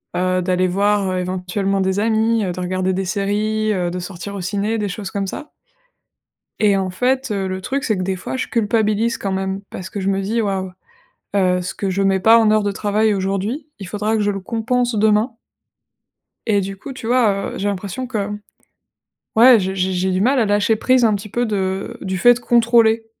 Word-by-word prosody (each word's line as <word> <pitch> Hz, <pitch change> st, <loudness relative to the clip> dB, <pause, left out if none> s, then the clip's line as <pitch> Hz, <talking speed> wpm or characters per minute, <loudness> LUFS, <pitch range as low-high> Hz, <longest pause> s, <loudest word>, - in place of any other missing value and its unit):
heu, 185 Hz, 0 st, +1 dB
d'aller 185 Hz, 0 st, +1 dB
voir, 200 Hz, +1 st, +1 dB
heu, 185 Hz, -, -1 dB
éventuellement 185 Hz, +2 st, -1 dB
des 190 Hz, +1 st, 0 dB
amis, 220 Hz, 0 st, +1 dB
heu, 180 Hz, -, -2 dB
de 185 Hz, -, -7 dB
regarder 185 Hz, +1 st, -1 dB
des 190 Hz, -, -1 dB
séries, 210 Hz, +3 st, 0 dB
heu, 180 Hz, -3 st, -1 dB
de 180 Hz, -, -4 dB
sortir 180 Hz, +2 st, -7 dB
au 195 Hz, -, -5 dB
ciné, 205 Hz, +4 st, -1 dB
des 210 Hz, -2 st, -1 dB
choses 195 Hz, +1 st, -6 dB
comme 200 Hz, -1 st, -2 dB
ça. 300 Hz, +10 st, -7 dB, 1.1 s
Et 205 Hz, -2 st, +4 dB
en 190 Hz, -1 st, -1 dB
fait, 255 Hz, +5 st, 0 dB
heu, 195 Hz, -2 st, -1 dB
le 185 Hz, 0 st, -4 dB
truc, 275 Hz, +7 st, -2 dB
c'est 215 Hz, -4 st, 0 dB
que, 185 Hz, -, -2 dB
des 190 Hz, +1 st, -1 dB
fois, 185 Hz, -, -5 dB
je -, -, -2 dB
culpabilise 220 Hz, 0 st, +1 dB
quand 195 Hz, -, -3 dB
même. 190 Hz, 0 st, -2 dB
Parce 185 Hz, 0 st, -7 dB
que 205 Hz, -, -5 dB
je 195 Hz, 0 st, -1 dB
me 195 Hz, 0 st, 0 dB
dis: 220 Hz, +4 st, -1 dB
«Waouh, 190 Hz, -3 st, -2 dB, 0.6 s
heu, 180 Hz, -2 st, +2 dB
ce 180 Hz, -, -5 dB
que 195 Hz, -, -2 dB
je 195 Hz, +1 st, 0 dB
mets 195 Hz, -1 st, +2 dB
pas 225 Hz, +4 st, +6 dB
en 220 Hz, -2 st, +4 dB
heures 215 Hz, 0 st, +3 dB
de 205 Hz, -, -1 dB
travail 210 Hz, +1 st, +1 dB
aujourd'hui, 195 Hz, +10 st, -2 dB
il 195 Hz, -3 st, -8 dB
faudra 210 Hz, +2 st, -1 dB
que 215 Hz, -, 0 dB
je 205 Hz, -, +1 dB
le 195 Hz, -1 st, -4 dB
compense 240 Hz, +4 st, -1 dB
demain». 215 Hz, +3 st, +2 dB, 1.2 s
Et 205 Hz, -2 st, +3 dB
du 195 Hz, +1 st, -5 dB
coup, 265 Hz, +7 st, -8 dB
tu 255 Hz, -3 st, -7 dB
vois? 225 Hz, -5 st, +2 dB
Heu, -, -, -6 dB
j'ai 200 Hz, -, -2 dB
l'impression 200 Hz, +5 st, -4 dB
que, 210 Hz, -5 st, -2 dB, 1.1 s
ouais, 235 Hz, 0 st, +8 dB
je 190 Hz, 0 st, -2 dB
j'ai 190 Hz, 0 st, 0 dB
j'ai 185 Hz, +1 st, 0 dB
du 185 Hz, 0 st, 0 dB
mal 260 Hz, +5 st, +3 dB
à 230 Hz, -, +3 dB
lâcher 205 Hz, +2 st, +2 dB
prise, 255 Hz, +3 st, +2 dB
un 220 Hz, -2 st, +4 dB
petit 205 Hz, +1 st, -5 dB
peu, 240 Hz, +4 st, -1 dB
de 190 Hz, -3 st, -2 dB
du 190 Hz, -1 st, -3 dB
fait 245 Hz, +4 st, +5 dB
contrôler, 230 Hz, -2 st, +3 dB
200 Hz, 215 wpm, -19 LUFS, 190-220 Hz, 1.2 s, ouais